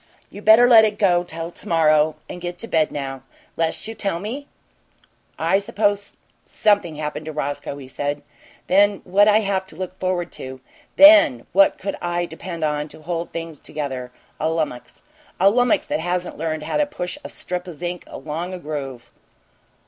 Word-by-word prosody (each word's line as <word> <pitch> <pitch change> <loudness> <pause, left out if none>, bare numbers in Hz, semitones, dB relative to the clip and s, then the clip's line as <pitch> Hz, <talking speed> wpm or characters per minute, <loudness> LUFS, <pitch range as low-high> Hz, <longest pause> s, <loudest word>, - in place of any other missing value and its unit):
"You 205 - -9
better 220 +3 +7
let 230 -3 +8
it 215 -1 +1
go 175 -4 +3
till 165 -1 -6
to - - -11
morrow 155 -2 +3
and 180 - -8
get 175 0 -5
to 230 - -5
bed 160 -6 +1
now 135 -2 -5 0.3
'less 165 +4 -2
you'll 225 - -6
tell 195 -6 -2
me?" 250 +9 -6 1.1
"Suppose 205 0 -1 0.3
something 205 -7 +1
happened 150 +1 -5
to - - -3
Roscoe," 145 -1 -4
he 135 -2 -10
said. 145 +2 -3 0.4
"THEN 200 +1 +3
what'd 205 +3 +4
I 215 +1 +4
have 195 -2 -1
to - - -12
look 185 0 -6
forward 180 -2 -1
to? 130 0 -6 0.4
THEN 295 - +7
what 195 +2 +5
could 195 +1 -4
I 175 0 -1
depend 170 0 -7
on 150 -1 -1
to 155 - -13
hold 170 +1 -3
things 165 -2 -6
together? 130 -4 -5 0.3
A 155 - 0
lummix! 155 -6 -3 0.4
A 195 +2 +6
lummix 245 +1 +2
that - - -2
hasn't 175 +2 -2
learned 155 -1 -3
how 155 - -1
to 295 -1 +2
push 180 -12 -5
a - - -7
strip 180 0 -5
o' - - -5
zinc 175 +2 -5
along 170 +4 -5
a - - -6
groove!" 140 -7 -6
175 Hz, 180 wpm, -22 LUFS, 155-200 Hz, 1.1 s, let